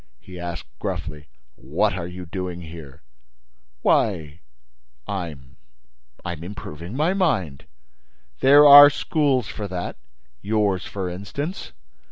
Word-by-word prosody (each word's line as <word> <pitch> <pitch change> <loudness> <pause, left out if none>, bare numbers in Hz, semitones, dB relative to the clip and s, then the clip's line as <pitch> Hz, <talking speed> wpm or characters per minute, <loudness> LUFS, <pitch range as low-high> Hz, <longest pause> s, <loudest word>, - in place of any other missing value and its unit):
He 90 -1 -12
asked, 85 -1 -6
gruffly: 75 -3 -5 0.2
"What - - -1
are 85 -2 -4
you 90 0 -8
doing 90 0 -5
here?" 80 -4 -11 0.8
"Why—I'm—I'm 65 0 -5
improving 85 0 -8
my 155 +6 +1
mind." 115 - -1 0.7
"There 145 +2 +7
are 145 0 +11
schools 140 - 0
for 105 +2 -6
that: 90 -2 -5 0.4
yours, 105 -4 0
for 95 -2 -4
instance." 120 - -6
90 Hz, 100 wpm, -23 LUFS, 75-110 Hz, 0.8 s, are